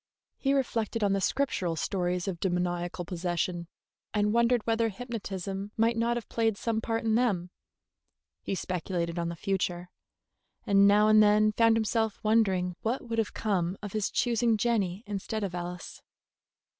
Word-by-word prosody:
He 275 0 +1
reflected 230 -4 -1
on 200 -1 +3
the 195 - 0
Scriptural 190 -8 0
stories 180 +1 -1
of 180 -3 -3
demoniacal 175 -1 -1
possession, 175 0 -2 0.5
and 210 0 +2
wondered 235 0 +3
whether 225 0 +1
hypnotism 200 -3 -5
might 230 +1 +3
not 235 +1 +1
have 235 - -6
played 225 -3 0
some 225 0 -1
part 225 0 -2
in 220 -1 +1
them; 200 -7 +1 0.9
he 195 - -3
speculated 175 -2 -3
on 170 0 -1
the 170 - -5
future, 180 -1 -2 0.7
and 200 0 +5
now 210 +1 +5
and 215 0 +7
then 210 0 +5
found 225 +1 +4
himself 220 -1 0
wondering 190 -5 +2
what 240 +2 -2
would 230 0 -1
have 220 - -2
come 190 -4 -1
of 205 - -6
his 215 -2 0
choosing 235 -2 +1
Jenny 205 -4 0
instead 210 +1 -4
of 190 -3 -3
Alice. 175 0 -6
205 Hz, 155 wpm, -29 LUFS, 180-225 Hz, 0.9 s, and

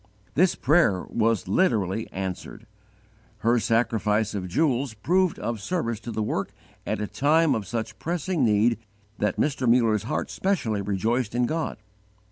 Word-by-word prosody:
This 180 +4 +3
prayer 140 - +3
was 115 -2 +1
literally 110 - +1
answered. 95 +3 -5 0.8
Her 120 +2 +3
sacrifice 110 -2 +1
of 95 -3 -3
jewels 135 - 0
proved 180 - +1
of 115 -3 -3
service 115 - -2
to 115 +1 -7
the 110 -1 -2
work - - -2 0.3
at - - -1
a 105 - -1
time 145 +10 +3
of 105 -4 -3
such 110 0 -4
pressing 175 -2 -1
need 110 +1 +3 0.4
that 105 -3 0
Mr. 135 -4 +1
Muller's 115 -3 +3
heart - - -2
specially 135 - 0
rejoiced 110 +4 -1
in 125 0 +2
God. 160 +5 -2
115 Hz, 145 wpm, -25 LUFS, 105-140 Hz, 0.8 s, This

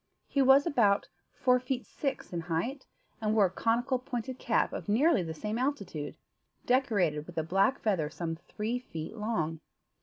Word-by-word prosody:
He 280 - +1
was 270 +2 +6
about 220 -11 +3 0.2
four 250 -2 +3
feet 250 0 -3
six 270 -9 -4
in 170 - -1
height, 175 - -3 0.3
and 215 0 +1
wore 210 -3 +6
a - - +1
conical 240 +6 +1
pointed 250 0 -5
cap 230 - +1
of - - -5
nearly 265 - +4
the 160 -2 -5
same 210 +7 -3
altitude, 200 - -3 0.5
decorated 200 - +2
with 175 - -11
a 160 - +1
black 195 - +2
feather 185 -9 0
some 165 +1 -4
three 215 +8 -4
feet 165 -6 -7
long. 175 -8 -1
220 Hz, 170 wpm, -30 LUFS, 175-255 Hz, 0.5 s, was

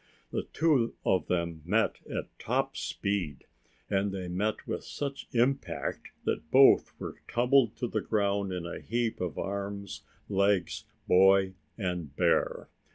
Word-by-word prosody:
The - - -2
two 145 -8 +2
of 95 - +2
them 85 -3 -1
met 105 +7 +1
at - - -5
top - - 0
speed, 100 -8 -2 0.4
and 100 0 +1
they 95 -2 -4
met 100 +5 -1
with - - -3
such 140 -1 -5
impact 130 +2 0 0.2
that 80 - -2
both 135 +1 +6
were - - -7
tumbled 125 -1 +3
to 120 - -2
the - - -1
ground 100 -2 0
in 90 -2 -3
a 85 - -5
heap 115 -1 -1
of 90 -3 -3
arms, 100 0 -4 0.3
legs, 100 -3 +1 0.2
boy 95 +1 +5 0.2
and 90 -8 -3
bear. - - +1
100 Hz, 140 wpm, -30 LUFS, 90-115 Hz, 0.4 s, both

